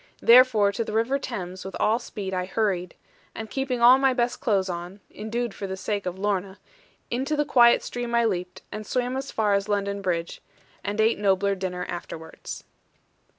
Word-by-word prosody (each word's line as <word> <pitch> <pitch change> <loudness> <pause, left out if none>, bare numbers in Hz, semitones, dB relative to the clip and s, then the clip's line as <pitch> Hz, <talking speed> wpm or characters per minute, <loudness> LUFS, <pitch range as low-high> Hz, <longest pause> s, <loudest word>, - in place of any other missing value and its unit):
Therefore 235 -4 +6
to 230 - -2
the 215 - -6
river 230 +5 +1
Thames, 185 -8 -6
with 190 0 -7
all 225 +2 +2
speed, 200 -5 -6
I 180 0 -1
hurried; 190 -3 -1 0.4
and 220 -1 -7
keeping 260 -3 -1
all 250 +2 +8
my 270 -1 +3
best 240 -1 0
clothes 200 -7 +1
on 175 +2 -6
(indued 225 +1 -3
for 195 -1 -5
sake 200 0 -3
of 180 +1 -4
Lorna), 195 -1 -2 0.5
into 265 +5 -1
the 295 0 +1
quiet 235 -3 +5
stream 240 -1 -3
I 235 0 +3
leaped, 180 -4 -3
and 215 - -5
swam 250 0 -1
as 270 +1 -4
far 210 -2 +1
as 200 +1 0
London 200 -1 -1
Bridge, 170 -3 -2 0.4
and 205 +1 -3
ate 220 0 +3
nobler 200 0 +2
dinner 180 -2 -4
afterwards. 160 -2 -7
210 Hz, 180 wpm, -25 LUFS, 190-235 Hz, 0.5 s, all